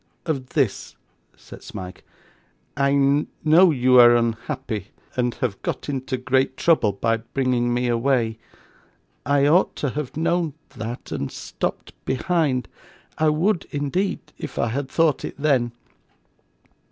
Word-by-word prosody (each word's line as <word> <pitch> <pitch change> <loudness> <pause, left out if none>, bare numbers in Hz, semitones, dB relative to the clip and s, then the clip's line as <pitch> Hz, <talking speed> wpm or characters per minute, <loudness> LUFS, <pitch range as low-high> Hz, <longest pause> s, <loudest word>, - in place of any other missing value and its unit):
'Of 135 -6 -3
this,' 135 -9 0 0.4
said - - -13
Smike. 90 0 -9 0.7
'I 140 +1 +2 0.2
know 170 +4 +7
you 130 -3 +4
are 120 0 +8
unhappy, 115 -2 -2 0.3
and 125 -1 0
have 120 -7 -3
got - - -4
into 130 -1 -2
great 130 +1 0
trouble 125 -12 +3
by 115 +4 0
bringing 120 +1 -1
me 125 +1 0
away. 120 -2 +1 0.9
I 140 -1 +3
ought 170 +6 +3
to 140 - -2
have 150 0 -5
known 165 -2 0
that, 115 +2 -7
and 70 - -3
stopped - - -5
behind 135 -3 0 0.5
I 155 0 +4
would, 170 +5 +1
indeed, 145 +7 -1 0.2
if - - -7
I 115 - +1
had 135 +3 -3
thought 165 -1 +2
it - - -5
then. 135 -5 +2
130 Hz, 130 wpm, -23 LUFS, 120-150 Hz, 0.9 s, are